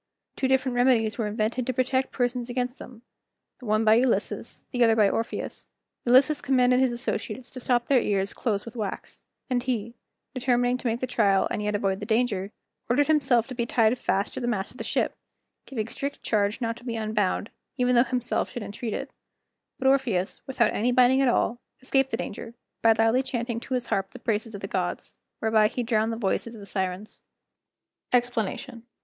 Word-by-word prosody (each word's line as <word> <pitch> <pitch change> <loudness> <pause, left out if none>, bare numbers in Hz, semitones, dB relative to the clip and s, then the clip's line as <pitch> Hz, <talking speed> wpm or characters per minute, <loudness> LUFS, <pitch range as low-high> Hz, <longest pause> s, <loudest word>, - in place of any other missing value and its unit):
Two 265 - 0
different 265 -1 +1
remedies 245 -3 +3
were 220 - 0
invented 220 +4 -1
to 255 - 0
protect 260 +1 0
persons 245 -1 -1
against 245 +1 -2
them, 240 -2 -12 0.6
the 250 - -10
one 215 +1 +2
by 215 - +7
Ulysses, 240 +1 0
the 245 -2 +2
other 225 -1 +5
by 215 -2 +5
Orpheus. 225 +4 -3 0.4
Ulysses 265 +5 +5
commanded 250 -1 +3
his 260 -1 +3
associates 240 0 -4
to 260 - -8
stop 240 -1 +1
their 260 -2 +4
ears 195 -1 0
close 210 -5 -2
with 230 +1 -9
wax; 210 -4 -5 0.3
and 250 -2 0
he, 235 -3 -2 0.4
determining 245 -1 +1
to 255 - -3
make 230 +1 -1
the - - +1
trial, 205 -6 +2
and - - -1
yet 210 0 -1
avoid 195 -1 0
the - - -6
danger, 220 -4 0 0.4
ordered 275 +5 +4
himself 270 -7 +3
to 265 - -8
be 235 -1 -2
tied 225 0 +3
fast 200 -5 -1
to - - -5
a - - -1
mast 210 -5 -1
of - - -16
the - - -5
ship, - - 0 0.5
giving 225 -5 -3
strict 280 +4 -5
charge 210 0 +1
not 230 -1 -1
to 235 - -14
be 235 -2 -4
unbound, 215 -2 -1 0.3
even 250 -1 +2
though 240 0 +6
himself 250 -2 -1
should 240 - -6
entreat 210 +2 -4
it; - - -5 0.7
but 265 - -6
Orpheus, 240 -9 +1
without 240 -4 +2
any 240 +4 +1
binding 255 +1 +5
at 270 - +3
all, 240 0 +1 0.2
escaped 270 +1 +1
the - - -2
danger, 230 +3 -6 0.3
by 225 -1 +6
loudly 225 +3 +3
chanting 235 -3 -3
to 255 - -3
his 250 -1 -1
harp 195 0 0
the - - -11
praises 225 0 -2
of 200 - -7
the - - -4
gods, - - -3 0.2
whereby 220 -1 +4
he 245 +3 -3
drowned 225 -1 +1
the 225 - -3
voices 230 +2 -1
of - - -10
the 200 - -10
Sirens. 190 +1 -4 0.9
EXPLANATION. 245 0 -1
235 Hz, 200 wpm, -26 LUFS, 215-250 Hz, 0.9 s, by